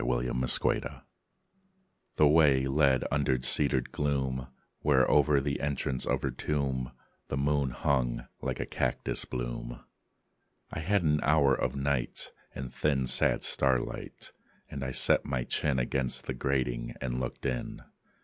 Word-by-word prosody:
BEFORE -, -, 0 dB
THE 65 Hz, 0 st, +1 dB
TOMB -, -, -8 dB, 1.1 s
The 75 Hz, -, +5 dB
way 70 Hz, -4 st, +4 dB
led 70 Hz, -1 st, +3 dB
under 70 Hz, -2 st, +1 dB
cedared 65 Hz, -1 st, +4 dB
gloom 65 Hz, -3 st, -1 dB, 0.3 s
Where, 70 Hz, -3 st, +3 dB
o'er 75 Hz, -1 st, +4 dB
the 70 Hz, +1 st, -2 dB
entrance 70 Hz, -3 st, -2 dB
of -, -, 0 dB
her -, -, 0 dB
tomb, 65 Hz, -4 st, -2 dB, 0.4 s
The 70 Hz, -, -3 dB
moon 70 Hz, 0 st, +1 dB
hung, 60 Hz, -1 st, -1 dB, 0.2 s
like -, -, -3 dB
a -, -, -2 dB
cactus -, -, -1 dB
bloom. -, -, -5 dB, 0.9 s
I -, -, -4 dB
had 95 Hz, +4 st, +1 dB
an 75 Hz, -1 st, +2 dB
hour 70 Hz, -2 st, +4 dB
of -, -, -1 dB
night 70 Hz, -2 st, -1 dB, 0.2 s
and 65 Hz, -1 st, -6 dB
thin 70 Hz, -3 st, 0 dB
Sad 65 Hz, +1 st, +2 dB
starlight; 65 Hz, -3 st, -1 dB, 0.4 s
and 70 Hz, -, -5 dB
I 65 Hz, -, -2 dB
set 65 Hz, -, +3 dB
my 65 Hz, -3 st, -2 dB
chin 70 Hz, +2 st, -1 dB
Against 65 Hz, +1 st, -2 dB
the -, -, -3 dB
grating 60 Hz, -2 st, -2 dB
and 65 Hz, -1 st, -3 dB
looked 65 Hz, +2 st, -5 dB
in. 65 Hz, -3 st, -3 dB
65 Hz, 145 wpm, -29 LUFS, 65-70 Hz, 1.1 s, The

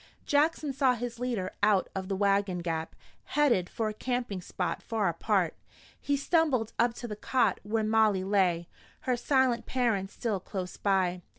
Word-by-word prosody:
Jackson 295 Hz, -1 st, +2 dB
saw 260 Hz, -1 st, +3 dB
his 240 Hz, 0 st, -5 dB
leader 235 Hz, -7 st, -2 dB
out 205 Hz, -2 st, +3 dB
of 190 Hz, -1 st, -4 dB
the 195 Hz, -, -1 dB
wagon 200 Hz, -1 st, +2 dB
gap, 165 Hz, -2 st, -3 dB, 0.4 s
headed 240 Hz, -12 st, +3 dB
for 225 Hz, -, -2 dB
a 215 Hz, -, -2 dB
camping 245 Hz, -4 st, -3 dB
spot 180 Hz, +1 st, -3 dB
far 220 Hz, -3 st, -1 dB
apart. 175 Hz, +1 st, +1 dB, 0.5 s
He 285 Hz, 0 st, 0 dB
stumbled 280 Hz, -7 st, +1 dB
up 235 Hz, 0 st, +3 dB
to 240 Hz, -, -6 dB
the 210 Hz, -, -5 dB
cot 250 Hz, +3 st, +1 dB
where 220 Hz, +2 st, -1 dB
Molly 215 Hz, -3 st, +3 dB
lay, 185 Hz, -4 st, +1 dB, 0.3 s
her 255 Hz, -4 st, 0 dB
silent 250 Hz, -1 st, +1 dB
parents 225 Hz, -7 st, 0 dB
still 220 Hz, -5 st, -2 dB
close 185 Hz, -1 st, -5 dB
by. 185 Hz, -3 st, +1 dB
215 Hz, 165 wpm, -29 LUFS, 190-245 Hz, 0.5 s, saw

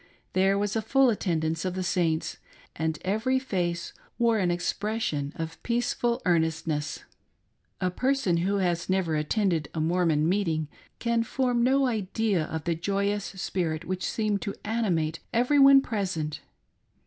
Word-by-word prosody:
There 195 Hz, +1 st, +3 dB
was 205 Hz, +1 st, -1 dB
a 225 Hz, -, +1 dB
full 265 Hz, +3 st, +4 dB
attendance 165 Hz, -6 st, -1 dB
of 185 Hz, -1 st, -2 dB
the 185 Hz, -, -2 dB
Saints, 170 Hz, -3 st, 0 dB, 0.4 s
and 160 Hz, -1 st, -1 dB
every 220 Hz, +7 st, +1 dB
face 175 Hz, -9 st, -2 dB, 0.2 s
wore 230 Hz, -2 st, +3 dB
an 180 Hz, -3 st, +1 dB
expression 175 Hz, -4 st, -1 dB
of 165 Hz, 0 st, -6 dB
peaceful 240 Hz, 0 st, 0 dB
earnestness. 160 Hz, -3 st, 0 dB, 0.8 s
A 185 Hz, -, 0 dB
person 255 Hz, -5 st, +1 dB
who 190 Hz, +4 st, +1 dB
has 175 Hz, -3 st, 0 dB
never 185 Hz, -4 st, +1 dB
attended 160 Hz, 0 st, 0 dB
a -, -, -1 dB
Mormon 160 Hz, -2 st, +2 dB
meeting 165 Hz, -5 st, 0 dB, 0.3 s
can 235 Hz, -1 st, +1 dB
form 245 Hz, 0 st, 0 dB
no 270 Hz, +2 st, +3 dB
idea 215 Hz, -5 st, 0 dB
of 160 Hz, -1 st, -5 dB
the 170 Hz, -, 0 dB
joyous 200 Hz, +4 st, -1 dB
spirit 170 Hz, -3 st, -3 dB
which 185 Hz, +1 st, -3 dB
seemed 210 Hz, -3 st, 0 dB
to 200 Hz, -, -4 dB
animate 175 Hz, -8 st, 0 dB
every 250 Hz, +5 st, +3 dB
one 275 Hz, 0 st, +8 dB
present. 185 Hz, -, -3 dB
185 Hz, 145 wpm, -27 LUFS, 165-225 Hz, 0.8 s, one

